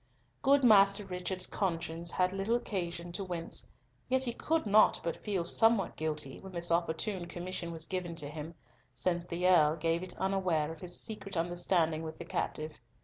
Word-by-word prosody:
Good 275 0 +4
Master 200 -3 +6
Richard's 185 0 -3
conscience 170 -3 -2
had 185 +2 +1
little 195 +4 0
occasion 175 -6 -3
to 175 +3 -3
wince, 175 -3 -4 0.4
yet 260 0 +2
he 240 -2 -1
could 320 +6 0
not 210 +1 +5
but 170 - -4
feel 195 -5 -1
somewhat 225 +2 +3
guilty 150 -4 -3
when 190 -1 -11
this 170 -1 0
opportune 175 +2 0
commission 175 -1 -4
was 165 -1 -5
given 180 -2 -3
to 150 -3 -2
him, 155 +2 -7 0.4
since 175 +5 0
the 175 +2 0
Earl 155 -4 +5
gave 165 +1 0
it 185 - -7
unaware 185 -5 0
of 160 - -9
his 175 -1 -1
secret 200 -4 -5
understanding 170 -1 +1
with 160 -1 -6
the - - -8
captive. 155 0 -3
175 Hz, 175 wpm, -32 LUFS, 165-195 Hz, 0.4 s, Master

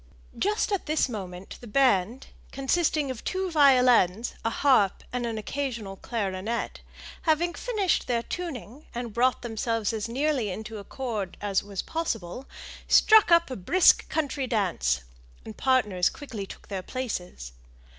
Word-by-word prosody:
Just 420 +2 0
at 395 -5 -1
this 310 -1 +2
moment 190 -5 -7
the 240 - -10
band, 235 -1 +2 0.3
consisting 290 +1 0
of 245 - -8
two 375 -1 -2
violins, 250 - +4
a 225 - +1
harp, 230 -6 +3
and 245 -1 -1
an 225 -1 -3
occasional 230 -4 -4
clarionet, 205 +1 -3 0.4
having 340 +1 +1
finished 415 -3 0
their 235 -2 0
tuning, 290 - -6
and 240 -2 -4
brought 250 +3 +2
themselves 225 -1 -1
as 220 +1 -3
nearly 265 -3 0
into 215 +3 -6
accord 210 -3 -5
as 200 -2 0
was 200 -2 -5
possible, 250 - -4 0.4
struck 435 -3 +6
up 335 -4 +5
a - - -3
brisk 330 - +4
country 285 -4 -1
dance, 175 - 0 0.4
and 110 - -8
partners 210 -9 +2
quickly 225 -9 -7
took - - -12
their 195 -2 -4
places. 180 - -5
240 Hz, 140 wpm, -27 LUFS, 205-285 Hz, 0.4 s, struck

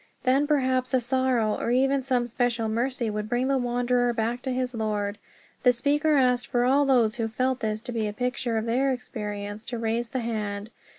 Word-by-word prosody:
Then 270 +3 +3
perhaps 260 -3 +1
a - - +4
sorrow, 250 -3 +1
or - - -1
even 270 +2 +2
some 250 -2 0
special 240 -1 -1
mercy, 240 +2 -1
would 210 0 -4
bring 245 +2 +1
the 270 -1 +2
wanderer 245 0 +1
back 230 +2 -1
to 260 - -3
his 250 0 -2
Lord. 210 -2 -2 0.4
The 250 - +6
speaker 295 +5 +2
asked 250 -2 +2
for 240 0 +1
all 275 +3 +4
those 240 -5 +3
who 225 -2 0
felt 255 +3 -1
this 215 -1 -2
to 245 - -6
be 225 -3 -1
a - - -2
picture 250 0 -1
of 220 - -1
their 260 +4 +1
experience 210 -4 -5
to 240 - -4
raise 230 +1 -1
the 260 0 -2
hand. 210 -2 -3
245 Hz, 200 wpm, -26 LUFS, 225-260 Hz, 0.4 s, The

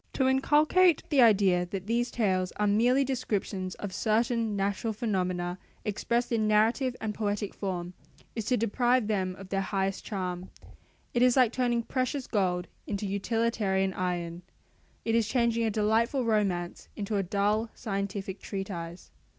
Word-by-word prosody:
To 265 - +2
inculcate 300 +6 +4
the 285 -4 +4
idea 195 -6 +5
that 190 0 -5
these 235 +3 0
tales 185 -5 0
are 210 - -1
merely 240 +6 +3
descriptions 205 -8 -2
of 205 -2 -6
certain 225 0 +1
natural 200 +3 -1
phenomena 185 -4 -2 0.3
expressed 235 +4 -1
in 220 -2 +1
narrative 225 +4 +2
and 220 -1 -3
poetic 205 -1 -2
form, 180 -3 -4 0.4
is 225 -3 -3
to 250 +2 +2
deprive 240 +2 +2
them 190 -4 -1
of 190 0 -11
their 195 0 0
highest 195 0 -1
charm; 185 -3 -4 0.6
it 240 - +1
is 250 +1 +5
like 250 -4 +5
turning 240 -2 0
precious 255 +2 -2
gold 180 -4 0 0.2
into 205 0 -3
utilitarian 200 -1 0
iron: 175 -2 -3 0.6
it 225 - +1
is 230 -2 +3
changing 235 -1 +1
a - - +2
delightful 225 +5 +1
romance 195 -6 -1
into 205 0 -2
a - - +2
dull 205 +4 0
scientific 200 -2 -4
treatise. 185 -3 -6
210 Hz, 150 wpm, -29 LUFS, 190-235 Hz, 0.6 s, idea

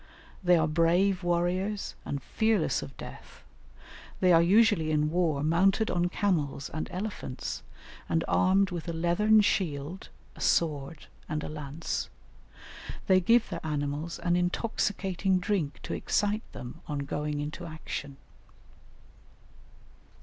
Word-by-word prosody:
They 180 -1 +5
are 160 -1 +2
brave 175 +4 +2
warriors 180 +4 0
and 140 -2 -4
fearless 220 -6 +1
of 75 - -9
death; - - -11 0.8
they 180 -1 +5
are 165 - +7
usually 195 -2 +4
in 150 0 +1
war 160 -5 +1
mounted 190 +7 +3
on 175 0 +1
camels 150 -9 -1
and 155 - -4
elephants, 185 -9 -4 0.5
and 165 - +1
armed 190 +1 +3
with 175 -2 -5
a 170 - -2
leathern 175 +6 +4
shield, 170 -3 -1 0.3
a - - -12
sword, 150 -2 0 0.2
and 155 0 -2
a - - -4
lance; 150 +1 -4 1.0
they 185 -1 +5
give 230 +6 +4
their - - -5
animals 150 +1 -2
an 175 0 +1
intoxicating 190 0 0
drink 180 -5 -1
to - - -4
excite 210 +1 -1
them 125 +7 -9
on 145 -2 -3
going 150 +1 -2
into 155 +4 -5
action. 155 -3 -6
170 Hz, 130 wpm, -29 LUFS, 150-190 Hz, 1.0 s, are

